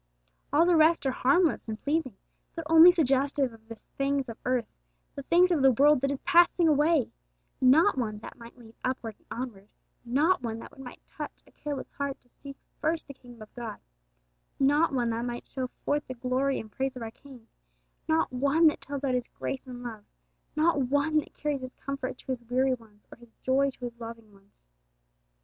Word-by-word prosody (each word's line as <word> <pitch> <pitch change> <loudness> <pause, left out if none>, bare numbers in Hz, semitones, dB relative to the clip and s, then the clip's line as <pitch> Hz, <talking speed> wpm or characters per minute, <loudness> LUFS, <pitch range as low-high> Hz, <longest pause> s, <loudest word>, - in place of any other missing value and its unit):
All 305 +4 +5
the 350 -1 +4
rest 320 0 +4
are 265 - +2
harmless 280 +5 +2
and 220 -1 -5
pleasing, 285 -7 -1 0.4
but 330 - -4
only 325 +2 +9
suggestive 275 -4 +1
of 225 0 -18
the 230 - -8 0.2
things 275 -1 0
of 230 - -7
earth, 250 -2 +1 0.5
the 280 - -6
things 350 +6 +4
of 325 -5 +2
the 270 0 +6
world 285 +2 +5
that 275 - +1
is 280 -1 -3
passing 345 0 +4
away; 300 -2 +3 0.5
not 275 +5 +5
one 215 -3 -2
that 210 - -10
might 235 0 -13
lead 225 -2 -15
upward 250 -3 -3
and - - -33
onward, 230 -5 -6 0.4
not 290 +9 +2
one 225 -2 -3
that 270 +4 -12
might 250 -2 -11
touch - - -8
a - - -22
careless 290 -2 -6
heart 280 -1 -3
to 245 - -32
seek 275 -1 -9 0.2
first 320 +1 -1
the 280 - -10
kingdom 245 -4 -14
of 215 - -17
God, 240 -2 -6 0.8
not 290 +4 +3
one 240 -3 0
that 230 +1 -2
might 240 0 -5
show 260 -1 -4 0.2
forth 295 0 0
the 255 - -6
glory 260 +2 0
and 215 - -9
praise 265 +4 -2
of 250 - -6
our 225 - -6
King, 250 -3 -15 0.6
not 320 -4 +1
one 280 +6 +3
that - - -6
tells 285 0 -5
out 265 -2 +1
His 250 -1 -1
grace 270 0 -5
and 245 -1 -8
love, 225 -4 -7 0.5
not 310 0 +3
one 285 +4 +2
that 300 - -9
carries 295 -2 -2
His 255 0 -8
comfort 270 -2 -5
to - - -15
His 245 -2 -4
weary 260 +2 +2
ones 220 -4 -12
or - - -12
His 240 -1 -19
joy 275 +2 +3
to 265 - -13
His 235 -1 -8
loving 230 -2 -9
ones. 195 0 -25
265 Hz, 205 wpm, -28 LUFS, 240-290 Hz, 0.8 s, only